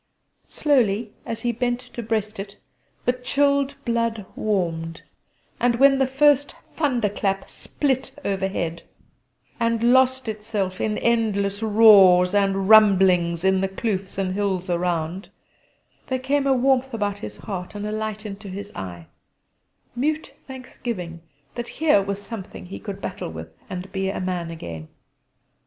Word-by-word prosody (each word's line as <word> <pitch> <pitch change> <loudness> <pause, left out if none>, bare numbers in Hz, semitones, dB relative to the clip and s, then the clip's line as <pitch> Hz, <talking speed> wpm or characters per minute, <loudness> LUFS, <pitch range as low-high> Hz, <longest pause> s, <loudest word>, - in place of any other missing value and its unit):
Slowly, 230 -7 +1
as 225 -1 -5
he 240 - +1
bent 240 +1 -1
to 250 -1 -8
breast 215 -2 -2
it, 200 +1 -7 0.5
the 245 - +3
chilled 280 +2 +1
blood 230 -3 -1
warmed, 165 -5 -2 0.6
and 245 -1 +2
when 275 +2 +5
the 265 - +3
first 285 +1 +3 0.2
thunderclap 210 -9 0
split 270 -2 -2
overhead, 190 -4 -2 0.8
and 230 +1 +2
lost 260 -1 +3
itself 210 -3 -3
in 215 -1 0
endless 210 -3 +1
roars 200 -5 +7
and 195 -1 +1
rumblings 190 -5 +5
in 190 0 +3
the 195 - +1
kloofs 195 -1 -3
and 190 -1 -1
hills 190 -2 -1
around, 175 +1 -2 0.8
there 260 - 0
came 275 +2 0
a 270 - +4
warmth 265 0 +2
about 205 -2 -2
his - - -8
heart 190 -1 -6
and 205 0 -4
a 210 - -3
light 215 0 -4
into 200 0 -7
his 200 +2 -7
eye 85 -3 -7 0.9
mute 305 +5 -1
thanksgiving 235 -10 -6 0.3
that 240 0 -5
here 300 -10 +4
was 200 0 -3
something 205 -3 -8
he 190 - -8
could 200 -3 -7
battle 185 - -5
with 80 0 -9 0.2
and 185 +1 -6
be 190 0 -1
a 195 - -3
man 180 -2 -3
again. 85 - -7
210 Hz, 140 wpm, -23 LUFS, 190-240 Hz, 0.9 s, roars